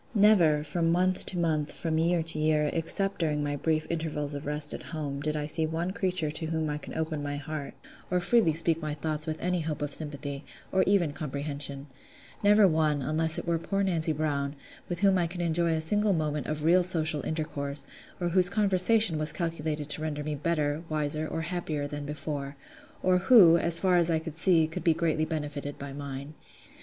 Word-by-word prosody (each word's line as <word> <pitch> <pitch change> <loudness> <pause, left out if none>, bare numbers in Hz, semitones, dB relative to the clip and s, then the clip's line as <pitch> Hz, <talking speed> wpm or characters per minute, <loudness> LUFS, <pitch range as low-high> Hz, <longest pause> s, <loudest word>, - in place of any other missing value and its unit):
Never, 180 -8 +5
from 165 +2 0
month 185 +2 +1
to 185 - -5
month, 155 -3 0
from 160 -2 -2
year 170 0 +2
to 160 -1 -3
year, 155 -1 +2
except 195 +4 +1
during 150 -3 0
my 145 0 -2
brief 155 +2 0
intervals 155 -3 -3
of 145 0 -6
rest 150 0 0
at - - -6
home, 145 -3 -5
did 150 +1 -2
I 150 - -2
see 155 +1 +1
one 165 +3 -2
creature 185 -5 -1
to 160 +1 -4
whom 160 -1 -1
I 150 - -3
could - - -9
open 160 -2 -2
my 145 0 -3
heart, 145 0 -6 0.3
or 180 - +1
freely 195 -1 +3
speak 165 +1 0
my 155 -1 -3
thoughts 155 +1 -3
with 155 0 -3
any 180 0 -1
hope 155 -2 -3
of 145 -1 -4
sympathy, 145 -2 -6 0.3
or 190 - +3
even 180 -7 +2
comprehension: 140 -1 -4 0.6
never 205 0 +6
one, 155 -4 +1
unless 160 +3 0
it - - -4
were 170 -1 0
poor 195 +4 -1
Nancy 165 -4 0
Brown, 145 -2 -2 0.3
with 175 0 -4
whom 195 -2 +4
I 170 - +1
could 180 +2 -8
enjoy 170 0 +1
a 160 - 0
single 205 +5 +2
moment 150 -3 -2
of 155 0 -3
real 175 +3 +5
social 160 -5 +1
intercourse, 145 -3 -3 0.3
or 175 -1 -1
whose 180 +1 +4
conversation 200 -2 +4
was 155 0 +4
calculated 155 -2 -3
to 155 - +1
render 150 -1 -3
me 155 0 -3
better, 150 0 -1
wiser, 155 0 0
or 165 - -3
happier 160 -3 -3
than 145 0 -6
before; 145 -2 -5 0.5
or 185 0 +3
who, 190 -4 +7
as 170 0 +4
far 185 -2 +2
as 170 -1 +3
I 165 - +2
could 160 -1 -6
see, 165 -1 +4
could 160 - -6
be 165 -2 +3
greatly 160 -2 0
benefited 145 -2 -4
by 140 0 -7
mine. 140 +1 -7
155 Hz, 205 wpm, -28 LUFS, 150-170 Hz, 0.6 s, who